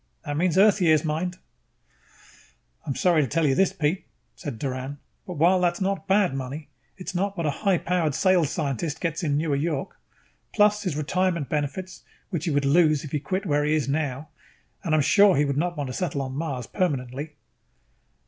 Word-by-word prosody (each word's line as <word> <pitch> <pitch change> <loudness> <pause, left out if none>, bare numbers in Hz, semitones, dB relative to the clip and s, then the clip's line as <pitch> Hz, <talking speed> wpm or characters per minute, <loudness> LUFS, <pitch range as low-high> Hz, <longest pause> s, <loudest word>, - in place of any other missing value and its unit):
That's 160 +4 0
Earth 210 +1 +5
years, 155 -3 +4
mind 165 +4 -2
you." - - -29 1.5
"I'm 135 - -2
sorry 175 -4 +3
to 140 - 0
tell 165 +6 +1
you 135 - +3
this, 190 +7 +3
Pete," 160 +4 -1 0.3
said 140 -6 -6
Doran, 130 +2 -4 0.3
"but 180 - -5
while 175 +4 +4
that 175 -1 +3
is 175 - -10
not 190 -4 -1
bad 195 -5 +3
money, 135 +3 -5 0.3
it 185 - -7
is - - -5
not 195 +2 -1
what 170 - -2
a 150 - +2
high 195 +4 +1
powered 165 -5 0
sales 180 -6 +3
scientist 150 +1 -2
gets 165 0 -2
in 145 -4 0
Newer 150 -2 0
York. 145 -1 -3 0.6
Plus 210 0 +4
his 185 -7 -2
retirement 170 -1 0
benefits, 155 +6 -3 0.3
which 170 -6 -2
he - - 0
would 145 -2 +1
lose 155 0 +4
if 150 - -8
he 150 - 0
quit 185 +8 -3
where 145 -3 +1
he 150 +1 +2
is 150 -3 0
now 145 0 -2 0.5
at. - - -22
And 160 -2 +2
I - - +3
am - - +4
sure 200 +5 +5
he 145 - +3
would 140 -1 -1
not 175 +3 -1
want 145 - -2
to 130 - -5
settle 145 -5 -2
on 130 -1 -5
Mars 140 -4 -3
permanently." 145 -2 -3
155 Hz, 205 wpm, -25 LUFS, 145-180 Hz, 1.5 s, Earth